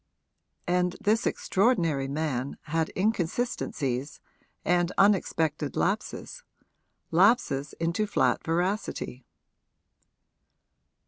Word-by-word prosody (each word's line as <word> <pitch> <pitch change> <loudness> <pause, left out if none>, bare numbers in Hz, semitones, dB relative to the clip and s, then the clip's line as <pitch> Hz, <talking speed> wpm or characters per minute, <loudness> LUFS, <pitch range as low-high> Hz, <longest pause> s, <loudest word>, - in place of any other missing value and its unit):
And 180 0 +1
this 225 +4 +2
extraordinary 175 - +1
man 140 -2 -2
had 160 +1 -1
inconsistencies 170 - -1 0.5
and 175 0 +2
unexpected 160 -7 +2
lapses 215 - -2 0.7
lapses 175 - +3
into 170 +6 0
flat 205 - +1
veracity. 170 - -2
175 Hz, 70 wpm, -27 LUFS, 150-200 Hz, 0.7 s, lapses